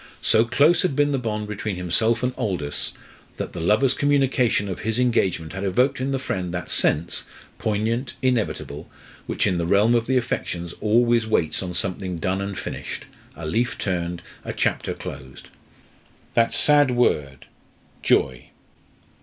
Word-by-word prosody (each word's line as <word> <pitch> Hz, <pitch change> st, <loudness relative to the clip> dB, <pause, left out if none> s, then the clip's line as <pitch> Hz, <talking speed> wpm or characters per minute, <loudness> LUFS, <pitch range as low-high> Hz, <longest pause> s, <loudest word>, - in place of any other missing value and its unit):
So 110 Hz, +1 st, +4 dB
close 150 Hz, +8 st, +4 dB
had 180 Hz, -7 st, 0 dB
been 145 Hz, +1 st, +3 dB
the 135 Hz, -, 0 dB
bond 105 Hz, -3 st, -3 dB
between 105 Hz, -1 st, -3 dB
himself 110 Hz, +7 st, +1 dB
and 125 Hz, 0 st, 0 dB
Aldous, 75 Hz, -8 st, -2 dB, 0.4 s
that -, -, -5 dB
the 85 Hz, -, -5 dB
lover's 105 Hz, +10 st, +3 dB
communication 135 Hz, -7 st, +2 dB
of 95 Hz, -, -4 dB
his 110 Hz, +1 st, -2 dB
engagement 95 Hz, -10 st, +1 dB
had 95 Hz, +1 st, -4 dB
evoked 125 Hz, +8 st, +1 dB
in 130 Hz, -, -1 dB
the 135 Hz, -, 0 dB
friend 95 Hz, -9 st, -3 dB
that 85 Hz, -2 st, -5 dB
sense 85 Hz, +3 st, +1 dB, 0.3 s
poignant, 110 Hz, +4 st, -1 dB
inevitable 115 Hz, -, -1 dB, 0.4 s
which -, -, 0 dB
in 90 Hz, -3 st, +1 dB
the 85 Hz, -, -1 dB
realm 105 Hz, +5 st, +4 dB
of 115 Hz, -1 st, +1 dB
the 130 Hz, 0 st, +2 dB
affections 85 Hz, -8 st, -3 dB
always 115 Hz, +1 st, +3 dB
waits 80 Hz, -8 st, +1 dB
on 90 Hz, -2 st, -5 dB
something 90 Hz, 0 st, -2 dB
done 95 Hz, +4 st, -1 dB
and 100 Hz, -1 st, -4 dB
finished, -, -, -6 dB, 0.3 s
a 80 Hz, +2 st, -7 dB
leaf 115 Hz, +10 st, 0 dB
turned, 85 Hz, -2 st, -2 dB, 0.2 s
a -, -, -4 dB
chapter -, -, -1 dB
closed. 65 Hz, -1 st, -9 dB, 0.8 s
"That 115 Hz, 0 st, +3 dB
sad 145 Hz, -2 st, +6 dB
word, 75 Hz, -, 0 dB, 0.6 s
Joy!" 65 Hz, -1 st, +1 dB
105 Hz, 155 wpm, -23 LUFS, 90-125 Hz, 0.8 s, sad